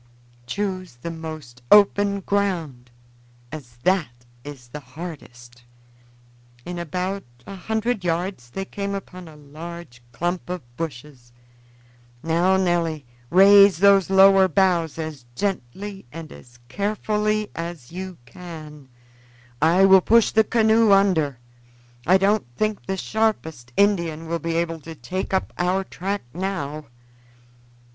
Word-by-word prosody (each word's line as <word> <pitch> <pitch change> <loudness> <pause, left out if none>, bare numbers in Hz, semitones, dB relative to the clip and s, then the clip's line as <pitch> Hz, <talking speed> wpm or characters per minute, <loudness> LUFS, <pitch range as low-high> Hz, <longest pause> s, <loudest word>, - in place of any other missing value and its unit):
Choose 185 - -4
the 170 - -3
most 155 -7 -9
open 200 -1 +5
ground, 170 -12 -2 0.6
as 130 -6 -10
that 145 -11 0 0.2
is 135 -4 -10
the 150 - -7
hardest." 130 -5 -11 1.0
In 175 0 -5
about 180 +4 -3 0.2
a 195 - -8
hundred 220 +2 -2
yards 170 -6 -2
they 195 +10 -5
came 200 0 -4
upon 185 -2 -8
a 155 - -13
large 150 -2 -10
clump 175 +9 -3
of 180 -4 -4
bushes. 135 -5 -7 0.9
"Now, 170 +4 +2
Nelly, 170 -5 0 0.2
raise 200 0 +7
those 195 0 +5
lower 195 0 +6
boughs 175 -3 +1
as 155 -6 -6
gently 195 -1 -4
and 165 +1 -9
as 120 -1 -15
carefully 210 - -1
as 165 -6 -7
you 185 0 -7
can. 150 -1 -11 0.7
I 170 +5 +5
will 190 -1 +7
push 230 +4 +4
the 220 - +4
canoe 220 -1 +3
under. 180 -9 +3 0.7
I 185 +2 +6
don't 200 - +1
think 215 +4 -2
the 190 0 -2
sharpest 160 - -2
Indian 170 -6 +1
will 170 +1 -2
be 165 0 -3
able 165 -1 -1
to 160 +2 -10
take 185 +5 -5
up 190 -1 -1
our 180 +2 +1
track 195 +2 -4
now." 155 -5 -4
175 Hz, 125 wpm, -23 LUFS, 155-195 Hz, 1.0 s, raise